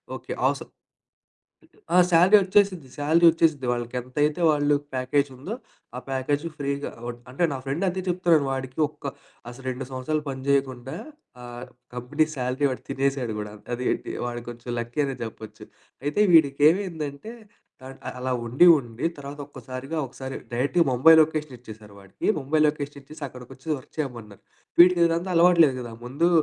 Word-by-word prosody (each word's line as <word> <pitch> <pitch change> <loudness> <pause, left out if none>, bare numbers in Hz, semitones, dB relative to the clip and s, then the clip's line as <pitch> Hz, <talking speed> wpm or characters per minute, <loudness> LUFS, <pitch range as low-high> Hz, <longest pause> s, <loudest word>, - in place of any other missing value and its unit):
Okay. - - -9
అవసర్ - - -1 1.2
ఆ! - - +4
Salary 180 +4 +6
ఒచ్చేసిద్ది, 190 -6 +2
salary 160 +4 +3
ఒచ్చేసిద్ది. 160 -4 +1
వాళ్ళకి 120 0 -3
ఎంతైతే 145 +6 -1
వాళ్ళు 145 -1 +2 0.2
ప్యాకేజ్ 130 +2 +1
ఉందో 145 - -6 0.4
ఆ - - -3
ప్యాకేజూ 140 +4 -1
ఫ్రీగా 140 -1 -3 0.2
ఓడ్ 120 0 -5
అంటే 135 +7 -2
నా 135 - -3
ఫ్రెండు 140 +7 -2
అంతే 185 +1 -1
చెప్తాడు. 175 -4 +3
వాడికి 130 0 -5
ఒక్క 145 -2 -7 0.4
అసలు 125 +2 -11
2 130 +1 -4
సంవత్సరాలు 135 +4 -2
పని 130 -1 -5
జేయకుండా 135 -2 0 0.5
ఆహ్, 120 0 -8 0.3
కంపెనీ 125 +5 0
శాలరీ 130 +2 -1
వాడు 130 - -6
తినేసాడు 135 -3 -1
గూడా! 105 0 -5 0.2
అది 125 +1 -3
ఏంటి - - -3
వాడు 120 0 -4
కొంచెం 120 +1 -10
లక్కీ 120 +5 -2
అనే 135 -1 -3
జెప్పొచ్చు. 110 -1 -8 0.4
అయితే 145 +8 +1
వీడికి 145 -4 +5
ఏమైందంటే 165 0 -3 0.5
థర్డ్ 130 +1 -11 0.2
అలా 130 +1 -2
ఉండి 130 +10 +5
ఉండి 120 -1 -6
తర్వాత 145 +1 -8
ఒక్కసారిగా 130 +3 -7
ఒకసారి 130 +1 -7 0.2
డైరెక్ట్‌గా 145 +8 +2
ముంబై 130 +6 +7
లొకేషన్ 155 -3 -1
ఇచ్చేసారు 110 -3 -12
వాడికి. 100 -1 -6
ముంబై 150 +3 0
లొకేషన్ 145 -1 -3
ఇచ్చేసి 155 +2 -11
అక్కడికొచ్చి 130 +3 -13
వర్క్ - - -20
చేయమన్నారు. 115 -8 -6 0.4
వీడికిదంతా 175 0 +5
అలవాటు 170 0 +6
లేదు 135 -3 -1
గదా! 120 -2 -8
ముందు 145 +8 +1
140 Hz, 150 wpm, -25 LUFS, 125-155 Hz, 1.2 s, ముంబై